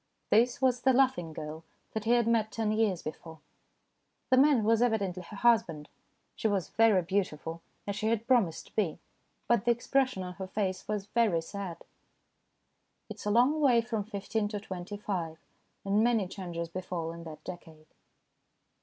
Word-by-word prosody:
This 235 +3 +4
was 250 -2 +3
the 265 0 +4
laughing 255 -11 +2
girl 155 +1 -7 0.3
that 220 -1 -3
he 235 - +4
had 240 -1 +3
met 225 -2 +2
ten 220 -2 -1
years 215 -5 +1
before. 160 +1 -8 0.9
The 255 - +6
man 275 -4 +5
was 225 +1 +3
evidently 200 -7 +1
her 190 +4 -10
husband. 190 -10 +2 0.5
She - - 0
was 200 -4 0
very 220 -5 +4
beautiful, 165 -3 -2 0.2
as 200 - -3
she 215 - -1
had 230 0 0
promised 230 -11 +2
to - - -21
be, 195 -8 0 0.5
but 235 -4 +3
the - - +2
expression 250 -2 +1
on 180 0 -6
her 190 +1 -6
face 190 -1 -2
was 210 -2 -2
very 210 -6 +2
sad. 195 -1 -6 1.3
It 215 - -7
is 205 - -7
a - - +2
long 250 +8 +3
way 255 -5 +5
from 225 -2 -3
fifteen 205 +1 -2
to 205 0 -4
twenty 190 0 -6
five, 175 -6 -3 0.5
and 200 +2 +3
many 230 -5 +2
changes 175 -3 -5
befall 170 -1 -4
in 170 0 -9
that 155 -1 -9
decade. 160 -3 -10
205 Hz, 170 wpm, -30 LUFS, 175-230 Hz, 1.3 s, The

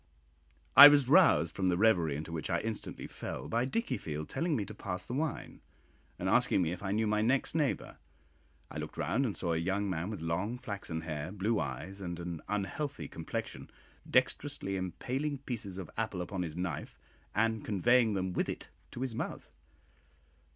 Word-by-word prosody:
I 145 - +14
was 145 -3 +5
roused 135 - +5
from 95 - 0
the 90 - +2
reverie 90 -8 +3
into 75 +3 -5
which 80 -2 -4
I - - +1
instantly 110 -1 -5
fell - - -6
by 115 +2 +1
Dickiefield 80 - -3
telling 165 -2 0
me 105 -6 -1
to - - -9
pass 90 -1 -5
the - - -6
wine, 150 +1 -3 0.6
and - - -3
asking 95 - +3
me 80 - 0
if 90 - -5
I 95 -1 -2
knew 110 +2 +1
my 105 0 +1
next 130 +5 +2
neighbour. 150 -4 -1 0.7
I - - -5
looked - - -6
round 130 +3 +1
and 105 - -4
saw 85 -2 -1
a - - +1
young 95 +5 0
man 85 +2 -2
with 105 - -5
long 90 +9 -2
flaxen 100 -8 -5
hair, 75 0 -4
blue 105 +3 0
eyes, 80 +9 -5
and 85 -2 -4
an 85 -2 -5
unhealthy 105 - -2
complexion, - - -5 0.4
dexterously 95 0 +1
impaling 130 - -2
pieces 115 -8 -5
of 95 -4 -7
apple 105 -5 -2
upon 95 +1 -4
his 85 -2 -4
knife, 90 -1 -4 0.4
and 110 +1 +1
conveying 110 +2 +3
them 95 -1 -1
with - - 0
it - - -5 0.2
to 120 - -6
his 130 -3 -2
mouth. - - -5
100 Hz, 180 wpm, -32 LUFS, 85-120 Hz, 0.7 s, I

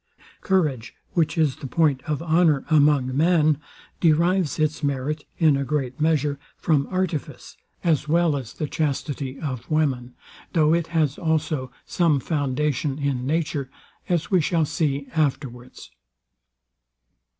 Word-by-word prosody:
Courage, 150 - 0 0.2
which 165 0 0
is 155 -5 +2
the 140 - -7
point 145 -2 +2
of 155 +1 -2
honour 160 -3 +3
among 145 -4 +3
men, 155 -1 +3 0.4
derives 170 0 +2
its 155 -1 0
merit, 145 +1 -2
in 155 -4 +4
a 140 - -1
great 135 -1 -3
measure, 150 -3 +1 0.2
from 145 -4 +1
artifice, 185 -5 -3 0.3
as 155 -3 +1
well 165 -1 +2
as 125 -3 -6
the 155 - -3
chastity 140 -2 -3
of 130 -5 -5
women; 135 -6 0 0.4
though 155 -2 +4
it 170 -1 +1
has 155 -3 0
also 155 -6 -1
some 165 -5 +2
foundation 145 -1 -1
in 135 -3 -2
nature, 150 -3 -1 0.4
as 175 0 0
we 185 -3 +4
shall 165 0 +1
see 145 -2 -1
afterwards. 135 -5 -3
150 Hz, 130 wpm, -23 LUFS, 140-160 Hz, 0.4 s, in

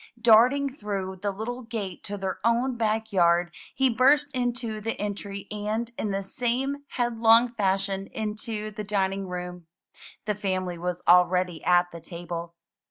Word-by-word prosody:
Darting 250 +5 +5
through 195 -5 -4
the 200 +2 -2
little 220 +5 -4
gate 215 -6 -5
to 205 0 -5
their 190 -1 -3
own 240 +3 +2
back 220 -1 -1
yard, 175 -1 +3 0.2
he 265 - +3
burst 280 +4 +3
into 245 -3 -2
the 225 +2 -3
entry 200 -1 -4
and, 215 +3 -2
in 215 - -2
the 195 0 -2
same 250 +7 -1 0.2
headlong 235 0 +4
fashion, 195 -2 0
into 215 0 -4
the 210 0 -6
dining 195 -1 -1
room. 180 -1 -6 0.6
The 210 - 0
family 185 -3 -2
was 180 0 -3
already 180 -1 +4
at 175 0 +3
the 170 - -9
table. 170 0 -7
210 Hz, 150 wpm, -26 LUFS, 185-230 Hz, 0.6 s, Darting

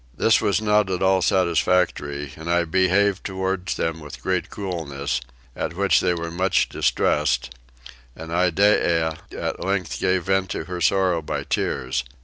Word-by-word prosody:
This 110 - +4
was 100 - +2
not 105 -2 +3
at 95 0 -1
all 95 0 +3
satisfactory 85 -6 +1
and 80 +2 -8
I 85 0 +2
behaved 95 +3 +2
towards 95 -1 -2
them 80 0 -2
with 75 -2 -10
great 95 -1 -1
coolness, 75 -9 -3 0.3
at - - -4
which 100 +1 +3
they 90 -1 +1
were 85 0 -4
much 95 +3 +1
distressed, 60 0 +1 0.6
and 80 +1 -9
Iddeah 85 -2 +2 0.2
at - - -3
length 95 -3 -2
gave 95 -1 +1
vent 95 0 0
to - - -3
her 90 +1 -6
sorrow 90 -1 +2
by 75 -2 -4
tears. 65 -1 -1
90 Hz, 150 wpm, -23 LUFS, 80-95 Hz, 0.6 s, This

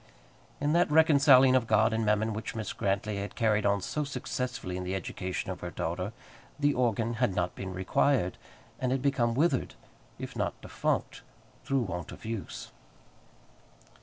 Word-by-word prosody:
In 145 +2 +1
that 175 0 +3
reconciling 140 -4 +6
of 125 -3 +2
God 110 +1 +3
and 110 0 0
Mammon 110 +1 +1
which 110 +2 -5
Mrs. 110 -2 -4
Grantly 100 +1 -1
had 100 +1 -5
carried 105 -2 +2
on 100 0 +2
so 150 - -2
successfully 125 -7 -4
in 90 - -3
the 90 +1 -2
education 95 0 -4
of 90 - -6
her 90 - -4
daughter, 90 +4 -3 0.5
the 145 0 +3
organ 115 -2 +1
had 120 -7 +2
not 90 0 0
been 95 -1 -6
required, 95 +3 +1 0.4
and 130 -1 0
had 135 0 0
become 120 -4 +1
withered, 140 -2 +1 0.4
if - - -7
not - - -2
defunct, - - -2 0.4
through 135 -1 +1
want 90 -6 -4
of - - -11
use. 110 -3 -5
110 Hz, 165 wpm, -29 LUFS, 95-130 Hz, 0.5 s, reconciling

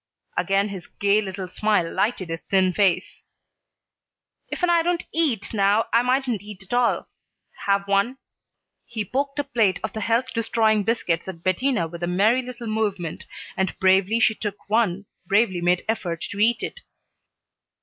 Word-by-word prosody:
Again 195 +1 +1
his 190 -3 -8
gay 205 +1 +2
little 190 -2 -5
smile 205 -1 +1
lighted 205 -6 0
his 165 0 -3
thin 190 -2 +3
face. 195 -2 +1 1.3
"Ifen 355 - 0
I 340 -1 +4
don't 350 +1 -1
eat 270 -12 0
now 205 +1 +3
I 230 - +6
mightn't 250 -4 0
eat 205 -1 -10
at 190 - -9
all. 245 -1 +2 0.6
Have 200 0 +2
one?" 200 +6 +1 0.7
He 220 -3 -4
poked 275 +6 -2
a 290 - +1
plate 230 -9 +1
of 220 - -3
the 220 - -4
health 235 +4 0
destroying 220 -2 +2
biscuits 190 -7 -1
at 170 -3 -8
Bettina 185 0 +1
with 170 +1 -9
a 175 - -1
merry 210 +8 +3
little 245 -1 -8
movement, 210 -7 -2 0.3
and 190 -1 -1
bravely 190 +3 +3
she 220 - +4
took 205 -2 -6
one, 205 -3 +1 0.2
bravely 195 -3 +2
made 175 +1 +1
effort 175 -7 -2
to 200 - -6
eat 230 +2 +3
it. 485 - -5
210 Hz, 160 wpm, -24 LUFS, 190-235 Hz, 1.3 s, I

